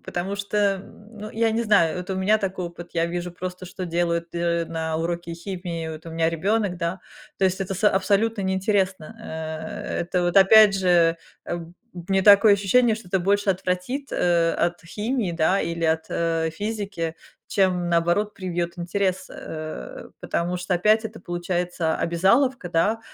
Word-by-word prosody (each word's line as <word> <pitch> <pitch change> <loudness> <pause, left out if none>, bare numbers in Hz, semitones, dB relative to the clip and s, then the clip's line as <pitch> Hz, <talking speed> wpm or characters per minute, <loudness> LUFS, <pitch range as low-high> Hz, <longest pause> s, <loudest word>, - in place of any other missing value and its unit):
потому 190 +3 -4
что, 200 +1 -4
м, 205 +2 -2
ну, 215 +1 -7
я 225 0 +1
не 225 +1 0
знаю, 180 -7 +3
вот 180 +1 -6
у - - -1
меня 205 +3 +3
такой 190 -3 -3
опыт, 170 0 -10
я 165 0 +1
вижу 175 +1 -4
просто, 180 +1 -6
что 185 +1 -6
делают 170 0 -1
д 170 - -3
э, 170 -1 0
на 160 -1 -3
уроке 170 +1 -3
химии, 170 -2 -5
вот 160 +1 -9
у - - -7
меня 165 0 +1
ребёнок, 195 +2 0
да. 170 +2 -3 0.4
То 195 - +2
есть 190 +1 +1
это 195 0 -2
с 205 - -4
абсолютно 200 +3 +1
неинтересно, 190 -1 0
э, 160 0 -5
это 175 +1 -1
вот 175 +2 0
опять 200 +1 +8
же, 175 -3 +3 0.3
э, 175 - -3
б 165 - -8 0.3
у 175 -1 -9
меня 190 0 +3
такое 205 +1 +7
ощущение, 215 +4 +3
что 215 -5 -11
это 190 - +1
больше 200 +2 +2
отвратит, 190 +9 -2
э, 170 -1 +2
от 175 0 -5
химии, 215 0 -2
да, 170 +4 +2
или 170 0 -3
от, 160 0 +1
э, 165 -1 0
физики, 200 -3 -4 0.3
чем 180 -3 +1
наоборот 175 +5 +1
привьёт 175 -1 -3
интерес, 185 +1 -1
э. 155 - -7
Потому 175 +1 -2
что 180 +1 -1
опять 215 +5 +3
это 220 0 -6
получается 175 -1 -2
обязаловка, 195 +6 +2
да, 205 +7 +1
180 Hz, 175 wpm, -24 LUFS, 170-200 Hz, 0.4 s, опять